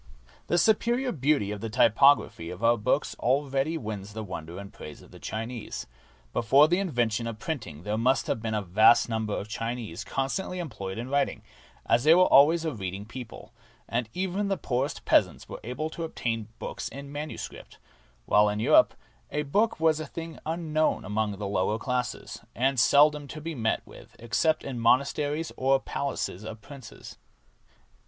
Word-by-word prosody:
The 175 - +2
superior 235 +7 +2
beauty 140 - +1
of 105 -1 -5
the 115 - -3
typography 120 -5 +4
of 90 +5 -8
our 115 +1 +5
books 125 +6 0
already 140 +4 +1
wins 105 -5 -6
the 110 0 -5
wonder 85 -3 -7
and 100 0 -9
praise 75 - -10
of - - -18
the - - -13
Chinese. 115 +1 -5 0.5
Before 135 +6 +5
the 175 +3 +2
invention 120 - 0
of 115 -2 -5
printing 110 - -5
there 105 +2 -2
must 130 +3 +2
have 110 - -2
been 110 -1 -2
a 105 - -1
vast 110 +7 +5
num 110 -1 -1
ber 105 - -2
of 100 - -5
Chinese 115 -4 -4
constantly 180 +8 -2
employed 110 - -5
in 120 +2 -4
writing, 140 0 0 0.4
as 120 +1 +3
they 160 +3 +7
were 180 - +6
always 160 +3 +5
a 160 - -1
reading 95 -2 -5
people, 115 -1 -10 0.3
and 115 -1 -2
even 190 +2 -1
the 195 -1 0
poorest 130 -1 -2
peasants - - +2
were - - -8
able 140 +7 -4
to 165 - -5
obtain 115 -8 -3
books - - -5
in 140 +3 -9
manuscript, 150 +2 -7 0.5
while 105 0 +4
in 105 0 -2
Europe 110 - +5 0.3
a 150 - -1
book 205 +10 +1
was 160 -1 +3
a 155 - -5
thing 165 +2 -7
unknown 155 -1 0
among 105 -1 -1
the 105 - -5
lower 100 +2 0
classes, 125 +2 -3
and 130 +1 +1
seldom 145 +4 +5
to 155 - -7
be 165 +2 -5
met 115 -5 -1
with - - -15
except 155 +7 +1
in 125 -3 -5
monasteries 145 +6 +1
or 135 +1 +3
the 135 - 0
palaces 130 -8 -3
of 110 0 -7
princes. 135 -1 -12
125 Hz, 175 wpm, -27 LUFS, 110-150 Hz, 0.5 s, they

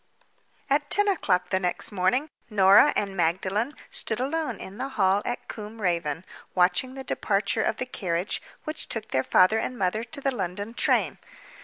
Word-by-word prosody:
At 290 +1 +1
ten 410 0 +4
o'clock 185 - +1
the 190 - +2
next 180 +3 -1
morning 205 +9 +1 0.2
Norah 195 -2 +6
and 200 -2 -1
Magdalen 190 - 0 0.2
stood 220 - -1
alone 275 -3 -2
in 195 +4 -9
the 265 +1 -3
hall 195 0 +3
at 245 - -4
Combe 215 +1 -8
Raven 170 -4 -1 0.3
watching 185 +9 +2
the 265 - -6
departure 210 -2 0
of 220 - 0
the 255 - -3
carriage 180 -6 -2 0.2
which 310 0 -4
took 225 -2 -3
their 130 - +2
father 185 +10 +4
and 255 - -3
mother 200 +3 0
to 235 +4 -5
the 275 -1 0
London 200 0 -4
train. - - +1
210 Hz, 170 wpm, -26 LUFS, 185-250 Hz, 0.3 s, Norah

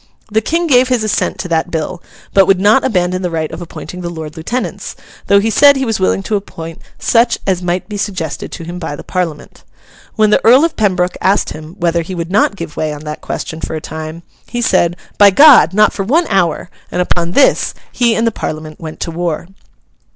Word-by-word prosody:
The 220 +1 +2
King 335 +9 0
gave 255 -5 +4
his 250 -3 0
assent 215 -1 -1
to 180 - -5
that 165 +1 0
bill, 170 +2 -4 0.3
but 195 -1 +5
would 195 -2 +4
not 210 +7 +4
abandon 185 -6 0
the 180 - -1
right 160 -2 -3
of - - -7
appointing 180 +1 -8
the 175 - -4
Lord 160 -3 -7
Lieutenants, 235 +11 -4 0.3
though 200 0 +5
he 220 +2 0
said 285 +4 +6
he 270 0 -1
was 225 -4 -1
willing 190 +1 +1
to 215 - -1
appoint 165 -5 -6 0.2
such 235 +1 +2
as 185 -2 0
might 180 +1 -2
be 210 -1 -5
suggested 185 -7 -4
to 170 - -7
him 175 +2 -7
by 160 -4 -4
the - - -10
Parliament. 170 -5 -4 0.5
When 215 -1 +3
the - - +3
Earl 255 +7 +6
of 335 - -2
Pembroke 185 -4 0
asked 195 +2 +1
him 155 +2 -10
whether 170 0 +1
he 180 +3 -6
would 170 0 -4
not 200 0 +2
give 165 -5 -7
way 155 -1 -2
on 150 0 -8
that 150 0 -6
question 160 0 -5
for - - -4
a - - -3
time, 160 +2 -7 0.2
he 240 - -4
said, 175 -8 +2 0.2
'By 205 -1 +8
God! 270 - +7
not 210 +2 +3
for - - -4
one 310 - +2
hour!' 175 -2 0 0.2
and - - -3
upon 175 -1 0
this 280 - +3 0.2
he 235 -2 +2
and 225 - +1
the 230 - +2
Parliament 155 -6 -6
went 160 -1 -8
to 165 - -3
war. 170 0 -3
180 Hz, 220 wpm, -15 LUFS, 165-215 Hz, 0.5 s, By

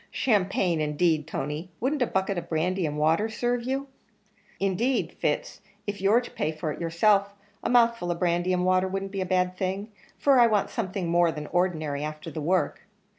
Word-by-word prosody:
"Champagne, 190 -7 +1
indeed, 155 +1 +1
Tony; 150 +4 -4
wouldn't 270 +4 -1
a 245 - +3
bucket 190 +1 0
of 170 -1 -5
brandy 175 +2 0
and 150 0 -4
water 160 +8 +2
serve 240 +2 -1
you?" 270 +2 -1 0.7
"Indeed, 200 +7 0
Fitz, - - -1 0.2
if 205 -2 -4
you're 210 +5 +4
to 245 - -10
pay 155 - -1
for 155 0 -4
it - - -7
yourself, 200 +4 +2 0.3
a - - -1
mouthful 235 -6 +3
of 175 - -1
brandy 175 +1 +1
and 180 0 +1
water 185 0 +3
wouldn't 195 +1 -4
be 195 -1 -3
a 185 - -2
bad 180 0 +1
thing 195 +3 -3 0.3
for 275 -3 +4
I 240 - +7
want 210 -3 +1
something 190 -4 -3
more 170 0 +3
than 150 -1 -6
ordinary 155 -5 0
afther 155 +1 -6
that 155 - -5
work. 180 +5 0
185 Hz, 190 wpm, -26 LUFS, 165-205 Hz, 0.7 s, I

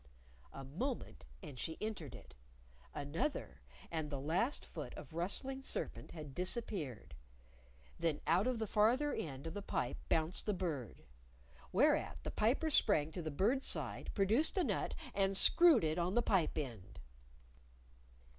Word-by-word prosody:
A 135 - -8
moment, 140 - -4 0.2
and 135 -4 -8
she 160 - -2
entered 210 - -4
it; - - -13 0.6
another, 150 - -3 0.3
and 160 -3 -2
the 140 -2 -3
last 180 - 0
foot - - -7
of - - -10
rustling 260 +11 -2
serpent - - -4
had 150 -4 -8
disappeared. 175 - -3 0.9
Then 165 -3 +1
out 180 +7 +3
of 255 -2 +1
the 220 - -1
farther 235 +8 +3
end 140 -2 -4
of 165 - -4
the 205 - -4
pipe 125 -9 -2
bounced 160 +5 +1
the 210 - +2
Bird. 150 - -3 0.7
Whereat - - +3
the - - -3
Piper 265 +9 +2
sprang 160 - +4
to 175 - -4
the 160 - -3
Bird's 215 - +2
side, - - -2
produced 220 - +3
a 370 - +4
nut, - - -1 0.2
and 195 -1 +2
screwed 335 - +7
it 155 +2 +1
on 175 +3 0
the 240 - +4
pipe 185 -8 +2
end. 115 -10 -5
175 Hz, 150 wpm, -37 LUFS, 150-220 Hz, 0.9 s, screwed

